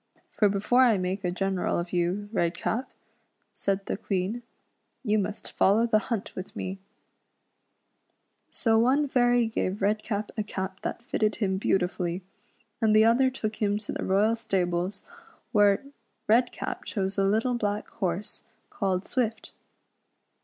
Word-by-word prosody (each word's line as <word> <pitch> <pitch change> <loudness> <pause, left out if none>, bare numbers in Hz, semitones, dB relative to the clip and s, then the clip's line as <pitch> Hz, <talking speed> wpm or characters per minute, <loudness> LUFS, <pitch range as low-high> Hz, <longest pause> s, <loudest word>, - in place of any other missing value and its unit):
For 210 - +3
before 205 +6 +3
I 235 -5 +5
make 185 +2 -2
a 180 - +1
general 190 +1 -1
of 170 +1 -4
you, 180 +4 0
Redcap," 210 +6 -1 0.6
said 195 0 -1
the - - -2
Queen, 200 +3 -2 0.3
" - - -48
you 215 -3 +2
must 200 +1 -4
follow 210 +4 +4
the 220 -2 +3
hunt 230 -5 -2
with 185 - -7
me:" 190 +1 -4 1.7
So 225 -2 +3
one 270 +5 +3
fairy 245 -2 +3
gave 210 -3 -2
Redcap 210 +1 -1
a 220 - -1
cap 190 -2 -5
that - - -4
fitted 215 -2 0
him 190 -3 0
beautifully, 180 -2 0 0.6
and 215 -1 +4
the 215 +1 +7
other 245 +3 +4
took 220 -4 -4
him 205 -1 +1
to 210 - -6
the - - -4
royal 210 +4 +3
stables 185 -4 -1 0.5
where 205 -1 +4 0.4
Redcap 240 +3 +1
chose 195 -1 -2
a - - +3
little 220 +6 +2
black 210 -3 -1
horse, 195 -2 -3 0.3
called 190 -2 -1
Swift. 230 -3 -2
205 Hz, 145 wpm, -27 LUFS, 190-225 Hz, 1.7 s, the